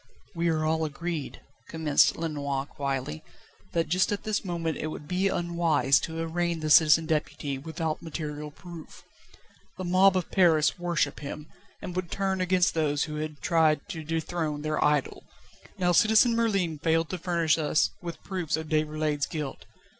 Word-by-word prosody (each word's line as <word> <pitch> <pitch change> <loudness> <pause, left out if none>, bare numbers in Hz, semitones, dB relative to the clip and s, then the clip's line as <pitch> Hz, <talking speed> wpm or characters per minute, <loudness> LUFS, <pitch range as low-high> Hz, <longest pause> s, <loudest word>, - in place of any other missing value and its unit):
"We 170 -1 0
are 155 -1 0
all 160 +1 +1
agreed," 160 0 -4 0.3
commenced 160 -3 +3
Lenoir 145 -4 -2
quietly, 135 - -4 0.5
"that 165 -1 +1
just 180 +6 +2
at 205 - -2
this 215 -1 -1
moment 170 -4 -2
it - - -2
would 150 -1 -7
be 185 +3 +1
unwise 170 -7 +2
to 160 0 -5
arraign 170 +1 -1
the 155 0 -1
Citizen 160 +1 +6
Deputy 150 -3 -2
without 160 +2 -3
material 150 -2 -5
proof. 170 +1 -12 0.7
The 185 - -5
mob 185 +2 +4
of 180 - -3
Paris 165 -4 +3
worship 175 -2 0
him, 150 +1 -7 0.3
and 180 - -6
would 185 -2 -3
turn 190 0 -1
against 185 0 +2
those 145 -3 +1
who 150 -1 -5
had 155 -1 -5
tried 160 -1 +2
to 165 -5 -5
dethrone 160 -1 -3
their 155 0 0
idol. 150 -2 +1 0.5
Now, 180 -1 +2
Citizen 220 +6 +5
Merlin 195 -9 0
failed 165 +1 +1
to 185 - -3
furnish 165 -2 +1
us 150 0 +2
with 170 -2 -7
proofs 175 -5 -2
of 160 -1 -6
Déroulède's 155 -1 0
guilt. 150 -5 -5
160 Hz, 160 wpm, -27 LUFS, 150-175 Hz, 0.7 s, Citizen